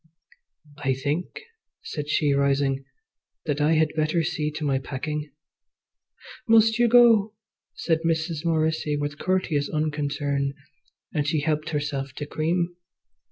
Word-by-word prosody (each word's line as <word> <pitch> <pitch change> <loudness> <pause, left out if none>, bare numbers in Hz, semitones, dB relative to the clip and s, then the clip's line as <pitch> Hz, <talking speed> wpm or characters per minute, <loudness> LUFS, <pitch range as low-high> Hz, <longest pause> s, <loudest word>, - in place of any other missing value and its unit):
"I 135 -3 0
think," 145 +6 -3 0.4
said 150 -1 -5
she 150 -1 +2
rising, 140 -1 +1 0.6
"that 145 -2 -1
I 150 +2 +4
had 155 -1 +2
better 155 +2 +1
see 150 -1 -1
to 150 - -5
my 135 -2 +1
packing." 150 +3 -4 1.2
"Must 225 0 +5
you 240 - +5
go?" 225 -3 +5 0.4
said 165 -2 0
Mrs. 165 -1 -1
Morrissy, 160 -2 0
with 145 0 -4
courteous 180 -6 0
unconcern, 145 -2 -1 0.6
and 150 -2 0
she 155 -1 +1
helped 155 0 -1
herself 145 -3 -3
to 145 - -5
cream. 170 +4 -1
150 Hz, 125 wpm, -25 LUFS, 145-165 Hz, 1.2 s, Must